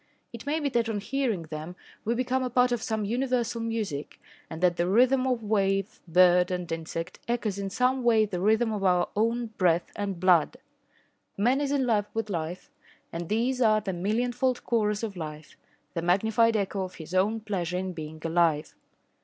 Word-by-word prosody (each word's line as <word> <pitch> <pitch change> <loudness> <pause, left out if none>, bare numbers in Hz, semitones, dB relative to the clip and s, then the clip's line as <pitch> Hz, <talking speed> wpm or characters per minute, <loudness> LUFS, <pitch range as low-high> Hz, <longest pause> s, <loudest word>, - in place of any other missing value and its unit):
It 235 +4 -9
may 305 +2 +1
be 295 - -1
that 235 -3 0
on 215 -2 -1
hearing 230 -4 -1
them 155 +2 -7 0.3
we 230 +2 +1
become 255 +1 0
a 255 - -1
part 250 0 +3
of 240 -2 0
some 220 -2 -2
universal 240 0 -1
music, 215 -11 -4 0.3
and 160 - -7
that 180 -1 +3
the 175 0 0
rhythm 255 +6 +4
of 245 -3 0
wave, 195 -2 0
bird 180 +1 +5
and 180 -1 -2
insect 165 +2 -5
echoes 225 -4 -1
in 195 -1 -3
some 255 +5 +1
way 225 -3 +4
the 190 -4 -4
rhythm 220 +3 +2
of 205 -2 -3
our 180 -2 +3
own 230 +2 0
breath 170 -1 +2
and 200 -3 -3
blood. 180 +4 +3 0.8
Man 245 +7 +2
is 280 -1 -1
in 280 -2 +1
love 210 -4 +1
with 225 -2 -2
life 170 +1 -4 0.4
and 170 0 -5
these 245 +4 0
are 215 -2 +5
the 200 -2 -4
millionfold 245 +7 0
chorus 210 -2 0
of 210 -3 -4
life 155 -2 -8 0.4
the 165 - -2
magnified 220 +6 +3
echo 200 -1 -2
of 185 -1 -5
his 160 +1 -10
own 205 +4 +2
pleasure 180 -5 -3
in 185 0 -3
being 155 -1 -7
alive. 165 -2 +1
210 Hz, 185 wpm, -27 LUFS, 180-235 Hz, 0.8 s, bird